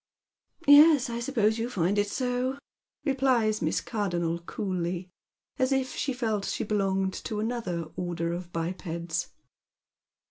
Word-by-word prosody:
" - - -66 0.2
Yes, 290 -3 +8
I 235 - -3
suppose 230 -3 +1
you 230 +2 -1
find 195 -2 +1
it 205 - +2
so," 250 +3 -1 0.5
repUes 255 -6 +2
Miss 160 -1 0
Cardonnel 175 -6 -1
coolly, 180 -3 -3 0.5
as 260 +1 +2
if 265 -1 0
she 280 - -1
felt 220 -5 -1
tliat - - -2
she - - -2
belonged 195 -2 0
to 215 - -3
another 215 -7 -2
order 170 -1 -2
of 175 0 -6
bipeds. 170 0 -3
210 Hz, 140 wpm, -28 LUFS, 175-245 Hz, 0.5 s, Yes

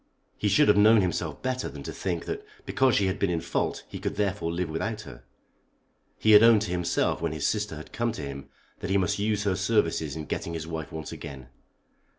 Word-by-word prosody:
He 105 - -1
should 100 +1 +4
have 105 - +5
known 110 +1 +7
himself 90 -3 -2
better 130 0 -1
than - - -9
to - - -6
think - - -3
that 415 0 -4 0.2
because 130 -1 +2
she 100 - +3
had 95 +1 -1
been 100 - +1
in 85 -2 0
fault 85 +1 -2
he - - -7
could - - -3
therefore 100 -4 -1
live 90 +1 -2
without 105 +8 -3
her. - - -12 0.9
He 110 - +3
had 105 0 +9
owned 115 -2 +6
to 90 - -4
himself 90 -2 0
when 85 -2 -1
his 75 - -3
sister 105 -5 -1
had 75 - -10
come 120 0 0
to 95 - -6
him 70 -1 -7 0.3
that - - -5
he 95 - +3
must 95 +1 0
use 105 0 0
her 100 -3 +1
services 85 -7 +1
in 80 -1 -5
getting 85 +2 -4
his 80 -2 -4
wife 80 -3 -5
once 80 -1 -6
again. 65 -3 -9
95 Hz, 225 wpm, -27 LUFS, 80-105 Hz, 0.9 s, had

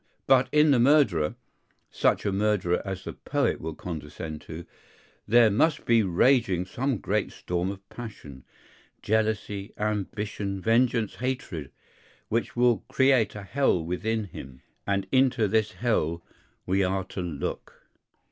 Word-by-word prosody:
But 130 -1 +4
in 150 0 +5
the 130 - +4
murderer, 120 - +3 0.6
such - - +1
a 100 - +1
murderer 95 -3 +1
as 95 -2 -6
a - - -5
poet - - -1
will 80 -1 -5
condescend 80 -2 -7
to, 80 +1 -8 0.6
there 115 -1 +6
must 150 +8 +1
be 115 -1 +4
raging 95 -1 +2
some 130 +6 -2
great - - -1
storm 90 +1 -3
of 100 0 -8
passion, 90 - -10 0.6
jealousy, 105 -2 -1
ambition, 105 -1 -3
vengeance, 115 +1 +1
hatred, 120 - -4 0.6
which 115 -2 -1
will 120 -1 +3
create 130 -6 +3
a 105 - -7
hell 95 -5 +1
within 110 +6 -1
him; 65 -9 -10 0.2
and 100 -1 0
into 130 -4 +3
this 110 +1 +1
hell 85 -8 -1 0.4
we 95 +1 +2
are 95 +1 0
to 95 - -6
look. 80 -5 -5
105 Hz, 135 wpm, -27 LUFS, 90-120 Hz, 0.6 s, there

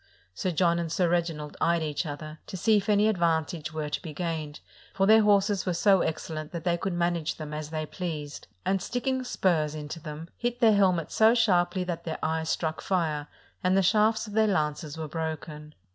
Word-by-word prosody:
Sir 185 - -2
John 170 0 +2
and 165 -2 -3
Sir 180 +1 +2
Reginald 165 -3 -1
eyed 170 0 +2
each 150 +2 -2
other, 155 +1 -7
to 190 - -6
see 220 +4 +4
if 200 +1 -2
any 210 0 +4
ad 215 -5 0
vantage 160 -1 0
were 155 -1 -3
to 150 - -3
be 155 -3 -8
gained, 160 -3 -3 0.4
for 195 - +3
their 220 +2 +7
horses 200 -2 +2
were 180 - +1
so 195 +2 +4
excel 160 0 -3
lent 155 0 -6
that 170 -2 -5
they 175 0 +2
could 185 +2 -3
manage 170 -2 0
them 150 -1 -7
as 150 0 -5
they 155 -1 -3
pleased, 150 -4 -6 0.2
and 190 0 +1
sticking 255 +4 -1
spurs 160 -10 0
into 150 +2 -6
them, 155 +1 -8
hit 240 0 -2
their 225 -2 +6
helmets 185 -5 +2
so 220 +2 +5
sharply 185 -5 +2
that 175 -2 -4
their 160 - -4
eyes 160 0 -1
struck 160 -1 -1
fire 155 -6 -1 0.4
and 185 +1 +3
the 195 - +4
shafts 215 +4 +3
of 210 - -9
their 220 0 +3
lances 150 -5 -1
were 160 -1 -4
broken. 155 -1 -5
170 Hz, 210 wpm, -27 LUFS, 155-195 Hz, 0.4 s, their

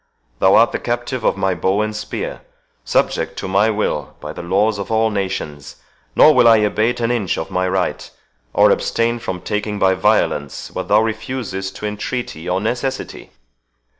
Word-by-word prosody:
Thou 95 +1 +5
art 115 +1 +5
the - - -2
captive 120 0 -3
of - - +1
my 95 -1 +1
bow 95 +4 +1
and 110 0 -3
spear—subject 105 - -3
to - - -4
my 100 +3 +3
will 105 -10 -2
by - - -7
the - - -7
laws 100 +4 +1
of 100 - -5
all 110 0 +2
nations; 95 -8 -4 0.4
nor 155 - +7
will 120 - +5
I 115 -1 +7
abate 110 +3 +1
an 115 0 0
inch 105 -8 -1
of 80 - -5
my 95 0 0
right, 95 -1 -2 0.4
or - - +5
abstain 115 +1 0
from 90 -5 -5
taking 105 0 -2
by 95 -1 +3
violence 95 -8 0
what - - -5
thou 105 +1 +5
refusest 110 -4 -4
to - - -6
entreaty 105 -4 -4
or 90 +1 +1
necessity." 125 +5 -3
105 Hz, 170 wpm, -19 LUFS, 95-115 Hz, 0.4 s, nor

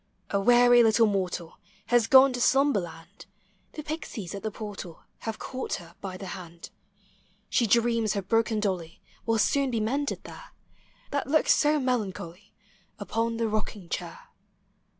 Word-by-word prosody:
A 200 - +1
weary 245 +2 +6
little 225 0 +5
mortal 185 -5 -2 0.3
lias 240 -2 +4
gone 265 0 +7
to 250 - -3
sluinberland; 195 - 0 0.5
The 305 - -7
Pixies 290 - -6
at 200 - -6
the 220 - -2
portal 200 -6 -8 0.2
Have 220 -1 -5
caught 260 0 -4
her 170 -2 -11
by 185 -2 -6
the 195 - -8
hand. 170 -2 -10 0.8
She 235 - +2
dreams 230 -1 +2
her 200 - -2
broken 225 +2 +1
dolly 180 -5 -3 0.3
Will 225 0 +2
soon 275 +5 +2
be 235 -3 -1
mended 275 +7 -2
there, - - -12 0.6
That 285 -2 -1
looks 310 +2 +4
so 300 0 +2
melancholy 205 -7 -3 0.5
Upon 230 +2 -2
the 230 -1 0
rocking 210 -4 -4
chair. 485 0 -6
225 Hz, 150 wpm, -27 LUFS, 195-250 Hz, 0.8 s, gone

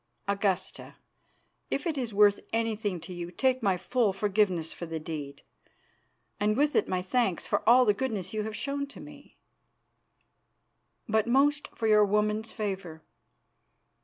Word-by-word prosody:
Augusta, 200 -2 -2 0.7
if - - -2
it 330 -3 -1
is 250 -5 -3
worth 205 0 +5
anything 220 -4 -1
to 180 - -9
you, 175 -1 -6
take 255 +6 +1
my 195 -4 +2
full 240 +1 +1
forgiveness 195 -4 0
for 170 - -7
the 160 0 -4
deed, 150 -3 -7 1.0
and 210 +2 +1
with 295 +2 +2
it - - +3
my 185 -1 -1
thanks 195 -2 0
for - - 0
all 250 +1 +7
the 210 - +4
goodness 205 -5 -3
you 215 - -1
have 215 0 -5
shown 280 +4 -3
to 280 - -12
me, 295 -1 -13 1.7
but 220 0 +1
most 285 +4 +3
for 225 - -3
your 210 -1 +6
woman's 210 +2 0
favour. 190 -7 -5
210 Hz, 150 wpm, -28 LUFS, 190-245 Hz, 1.7 s, all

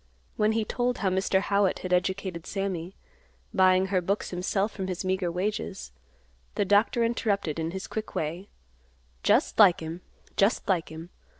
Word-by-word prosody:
When 215 +1 +2
he 220 -1 0
told 245 +2 -1
how 195 - +1
Mr. 190 +1 +2
Howitt 200 -1 +2
had 180 - -1
educated 185 -1 -1
Sammy, 190 -3 -3 0.6
buying 185 0 +4
her 185 - +3
books 200 +4 -2
himself 195 +4 -1
from 190 -2 -5
his 185 0 -4
meager 185 -2 0
wages, 180 - -3 0.6
the 205 - +1
doctor 205 +4 +3
interrupted 200 -8 0
in 160 0 -1
his 190 +2 -5
quick 220 0 -6
way, 170 +6 -3 0.7
"Just - - +2
like 195 -5 +7
him! 165 +2 -6 0.3
just 200 +5 +2
like 180 -4 +1
him. 160 +3 -9
190 Hz, 160 wpm, -27 LUFS, 180-205 Hz, 0.7 s, like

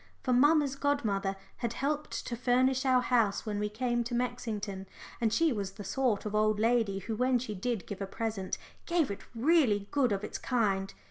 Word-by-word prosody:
For 255 - +1
mamma's 290 +1 +4
godmother 215 -10 0 0.2
had 235 -1 -2
helped 295 +4 -2
to 240 - -3
furnish 255 +2 +2
our 255 -1 +5
house 230 -5 +2
when 210 -2 -2
we 210 0 -1
came 240 +2 0
to 240 +1 -3
Mexington, 215 -6 -3 0.3
and 225 -2 +2
she 325 +3 +3
was 200 -3 -3
the 205 - -8
sort 225 +1 0
of 210 - -3
old 215 0 +2
lady 225 -3 +2
who 215 +3 -4
when 250 +2 +2
she 235 -3 -4
did 215 +1 -2
give 200 -1 -7
a 195 - -2
present 215 -2 -3 0.3
gave 340 - +2
it 200 - -6
really 235 -7 +3
good 270 -5 +2
of 200 0 -1
its - - -5
kind. 200 -6 0
230 Hz, 195 wpm, -31 LUFS, 205-255 Hz, 0.3 s, our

